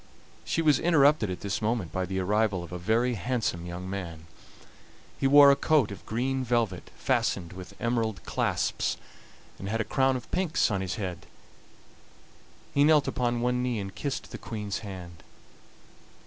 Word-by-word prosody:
She 165 - -1
was 150 -3 +4
interrupted 150 - +4
at 90 - -5
this 100 0 -2
moment 110 -6 -1
by 95 +1 -2
the 95 +1 -3
arrival 100 0 +1
of 85 - -10
a 90 - -5
very 115 +7 +1
handsome 105 -5 -2
young 90 +1 -6
man. 85 -5 -6 0.9
He 135 - +3
wore 140 0 +9
a - - +5
coat 140 -6 +2
of 100 - -9
green 130 +4 -1
velvet 115 -7 -1
fastened 90 -2 0
with 90 0 -11
emerald 115 -5 -1
clasps, - - 0 0.6
and 95 - -5
had 115 +2 -1
a - - +2
crown 135 0 +2
of 125 - -7
pinks 180 -10 +1
on 100 -2 0
his 90 -2 -3
head. 95 -5 -5 1.5
He 140 - +4
knelt 150 -1 +5
upon 120 -1 0
one 125 +1 +1
knee 125 -2 -1
and 95 -2 -5
kissed 135 +5 -4
the - - -7
Queen's 105 -3 -4
hand. 90 -5 -9
110 Hz, 165 wpm, -28 LUFS, 95-130 Hz, 1.5 s, wore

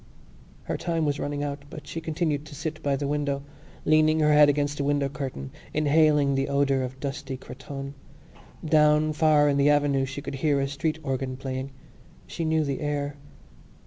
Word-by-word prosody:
Her - - -3
time 165 -2 -1
was 145 -1 0
running 145 0 -2
out 140 0 -4
but 150 - -9
she 155 +2 -5
continued 155 -2 -1
to 150 - -10
sit 155 +1 -5
by 140 -2 +1
the 140 +1 -2
window, 140 -1 -1 0.4
leaning 155 0 +4
her 150 0 +4
head 150 0 +7
against 145 0 0
the - - +1
window 145 0 +1
curtain, 130 - -6 0.2
inhaling 150 -1 +4
the 135 +1 0
odour 140 -1 +2
of 130 +1 -5
dusty 135 -1 -4
cretonne. 135 +2 -8 0.7
Down 150 0 +4
far 150 -1 +4
in 140 -1 +2
the 140 +1 +4
avenue 145 -2 +3
she 135 +1 -6
could 140 - -5
hear 145 -3 +2
a 135 - 0
street 145 +3 -2
organ 130 -1 -2
playing. 130 0 -4 0.6
She 165 - -4
knew 160 0 +2
the 140 -2 -3
air. 145 -1 -2
145 Hz, 180 wpm, -26 LUFS, 140-150 Hz, 0.7 s, head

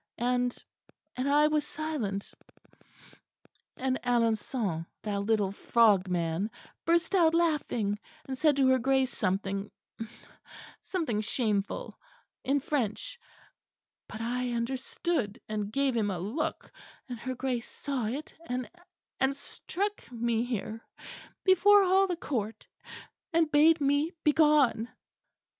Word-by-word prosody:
And 245 +1 +1 0.6
and 255 +2 -1
I 295 +1 +5
was 305 0 +2
silent; 290 -11 -4 1.4
and 260 0 0
Alençon, 225 -7 0 0.2
that 205 -2 -1
little 205 -1 +1
frog 205 -2 +3
man 175 +3 0 0.4
burst 340 +3 +2
out 330 -4 +5
laughing 275 -11 +1 0.3
and 265 - -4
said 300 +2 +3
to 270 -1 +4
her 260 0 +4
Grace 265 +1 +1
something 195 +1 -1 1.1
something 305 - -1
shameful 215 - -1 0.4
in 280 +2 +1
French 295 - -2 0.9
but 220 - -7
I 245 +1 -1
understood, 250 0 -2
and 210 -1 -3
gave 275 +1 +1
him 215 -3 +1
a 190 - -2
look; 215 - -3 0.4
and 245 -3 -6
her 255 +2 -4
Grace 250 -2 -2
saw 270 -6 -3
it, 275 +7 -5
and, 250 0 -2 0.5
and 265 +1 +2
struck 400 - -5
me 235 -1 0
here, 225 -2 -4 0.6
before 400 +2 +6
all 380 +1 +4
the 360 - -1
Court, 225 -9 -4 0.7
and 325 -2 +3
bade 310 +3 +6
me 285 +4 +1
begone." 295 -7 +4
250 Hz, 115 wpm, -29 LUFS, 215-300 Hz, 1.4 s, before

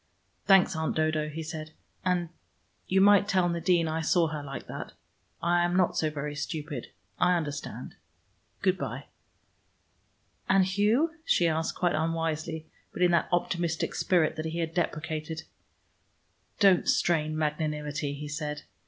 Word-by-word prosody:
"Thanks, 195 -2 +5
Aunt 160 0 -1
Dodo," 155 -1 +1
he 160 +2 -5
said. 155 0 -7 0.3
"And 180 -1 +2
and 170 - -8 0.6
you 190 +1 +3
might 205 0 +6
tell 185 -3 +2
Nadine 170 0 +2
I 160 +1 -1
saw 165 0 +2
her 155 -1 -4
like 140 -1 -7
that. - - -7 0.5
I 175 +1 +3
am 175 0 +1
not 185 -2 +2
so 155 - +1
very 150 -1 -4
stupid. 145 -3 -5 0.3
I 180 0 +4
understand: 145 -4 -5 0.7
good - - +2
by." - - -4 1.4
"And 190 -1 +5
Hugh?" 210 - +2
she 175 - +3
asked, 160 0 -1
quite 175 -1 +1
unwisely, 160 0 -2 0.3
but 180 - -1
in 175 - +5
that 170 - +2
optimistic 170 -1 0
spirit 165 -4 +2
that 155 - -3
he 160 +1 -3
had 165 -1 -2
deprecated. 160 -2 -2 1.2
"Don't 195 -4 +5
strain 155 -2 +2
magnanimity," 150 -1 -2
he 150 +1 -6
said. 150 0 -4
160 Hz, 145 wpm, -28 LUFS, 155-175 Hz, 1.4 s, might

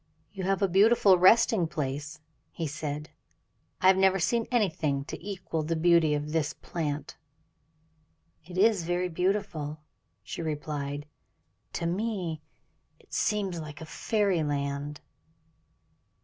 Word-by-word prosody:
"You 190 -3 -5
have 195 +1 +1
a - - +5
beautiful 195 0 +5
resting 210 -1 +5
place," 150 0 -4 0.3
he 165 - -4
said. 150 0 -4 0.7
"I - - 0
have 190 0 +7
never 190 0 +4
seen 230 +6 +1
anything 160 - 0
to 165 - -8
equal 185 -5 -3
the 160 +2 -1
beauty 165 -2 +4
of 150 +1 -3
this 160 -1 0
plant." 150 -3 -4 1.3
"It 180 +3 -9
is 210 -1 +4
very 175 +2 -1
beautiful," 175 -4 -1 0.4
she - - -6
replied; 145 -2 -3 0.7
"to - - -3
me 180 -4 -2 0.6
it - - -22
seems 195 -5 0
like 150 -2 -8
fairyland." 150 -6 -1
165 Hz, 120 wpm, -28 LUFS, 150-195 Hz, 1.3 s, have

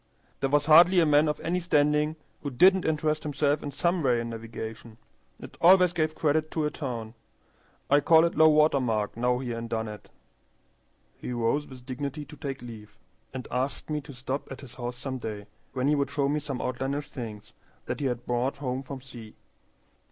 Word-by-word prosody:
"There 135 - 0
was 145 +1 +2
hardly 170 +4 +7
a 165 - +5
man 150 0 +4
of 150 - -1
any 175 +2 -1
standing 150 -2 +2 0.3
who 145 - -3
didn't 185 +8 +4
interest 155 0 0
himself 145 -1 0
in 145 - -4
some 170 +4 0
way 125 -4 +2
in 115 0 -4
navigation. 115 0 -8 0.4
It - - -11
always 180 0 +6
gave 155 -2 0
credit 155 0 +1
to 155 -1 -1
a 150 - -1
town. 115 -6 -5 0.7
I 145 - +5
call 160 +2 +5
it 170 - -1
low 160 0 +6
water 150 -2 +4
mark 110 -5 -1
now 125 +1 +1
here 120 -2 -4
in 115 - -5
Dunnet." 110 -2 -5 1.1
He 125 - -5
rose 120 +5 0
with 130 -2 -13
dignity 140 +3 -5
to 150 - -12
take 135 -3 -6
leave, 110 -2 -11 0.3
and 130 -1 -6
asked 130 +5 -2
me 150 -1 -1
to 140 0 -11
stop 130 +3 -5
at 135 - -8
his 130 -3 -12
house 120 0 -5
some 130 0 -5
day, 105 -3 -6 0.3
when 130 0 0
he 150 - +4
would 140 -1 0
show 140 -1 0
me 150 +2 0
some 140 -3 -4
outlandish 135 +3 -2
things 110 -3 -8 0.3
that - - -4
he 140 - 0
had 120 -1 -3
brought 125 +3 -1
home 130 -2 -3
from 135 0 -8
sea. 120 -4 -11
140 Hz, 195 wpm, -27 LUFS, 120-150 Hz, 1.1 s, hardly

